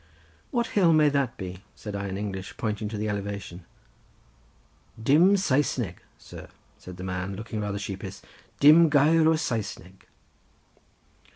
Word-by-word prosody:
"What 240 -4 0
hill 180 -5 +4
may 155 -1 +5
that 140 -4 -1
be?" 95 0 -7
said 105 -2 -7
I 100 0 -3
in 95 0 -4
English, 95 -2 -6
pointing 105 -1 -3
to 110 - -5
the 105 +1 -2
elevation. 100 -3 -5 1.3
"Dim 165 - +4
Saesneg, 130 - 0 0.2
sir," - - -11 0.3
said 90 -1 -11
the 90 - -7
man, 95 +1 -4
looking 110 +1 -5
rather 100 -1 -3
sheepish, 100 -2 -6 0.4
"Dim 155 +3 +7
gair 155 +2 +4
o 160 - +4
Saesneg." 100 - -5
105 Hz, 135 wpm, -26 LUFS, 95-150 Hz, 1.3 s, Dim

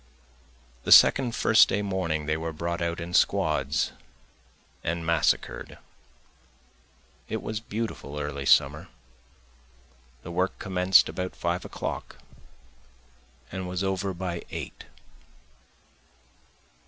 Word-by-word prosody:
The - - -3
second 125 -4 +7
First 110 - +5
day 105 - 0
morning 90 -6 -2
they 75 +1 0
were 80 +1 -4
brought 85 +2 -4
out 85 +1 -2
in 85 +1 -6
squads - - +1 0.9
and 85 0 -2
massacred, 85 -2 0 1.5
it - - -3
was 110 -1 -3
beautiful 110 -10 -5
early 70 -2 -4
summer, - - +3 1.4
The - - -7
work 90 +2 -1
commenced 95 -1 +4
about 90 0 -5
five 85 +1 -2
o'clock - - -6 1.3
and 95 -1 -5
was 90 +1 -2
over 95 0 -1
by 90 -1 -4
eight. - - -7
90 Hz, 105 wpm, -26 LUFS, 85-95 Hz, 1.5 s, second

